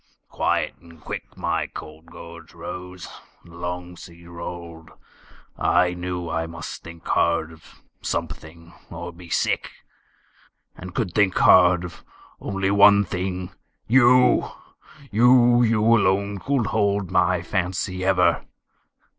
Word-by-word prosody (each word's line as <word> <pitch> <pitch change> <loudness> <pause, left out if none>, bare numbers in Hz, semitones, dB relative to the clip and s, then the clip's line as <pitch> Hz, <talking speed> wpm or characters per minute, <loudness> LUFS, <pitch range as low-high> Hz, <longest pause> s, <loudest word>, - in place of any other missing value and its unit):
Quiet - - -1
and 85 -1 -17
quick - - -8
My - - -1
cold 80 +2 -11
gorge 85 0 -12
rose; 90 0 -8 0.4
the 85 - -16
long 90 0 -6
sea 85 -1 -14
rolled; 85 -1 -9 0.7
I 90 -1 +2
knew 90 -1 -5
I 80 0 -2
must 85 0 -8
think 85 -1 -12
hard 80 0 +1
of 80 - -19 0.2
something, 85 +1 -6 0.2
or 85 +1 -7
be 85 0 -14
sick; - - 0 1.1
And 90 0 -10
could 95 -8 -2
think 105 -3 +2
hard 90 -1 +5
of 85 -2 -9 0.4
only 95 -1 -2
one 100 0 +6
thing 90 0 -4 0.3
YOU! 125 +1 +4 0.6
You, 120 +2 +5
you 115 -2 +2
alone 100 -3 +2
could 135 +1 0
hold 100 -3 0
my 90 -2 +2
fancy 90 +1 -2
ever! 95 -1 +2
90 Hz, 120 wpm, -23 LUFS, 85-100 Hz, 1.1 s, one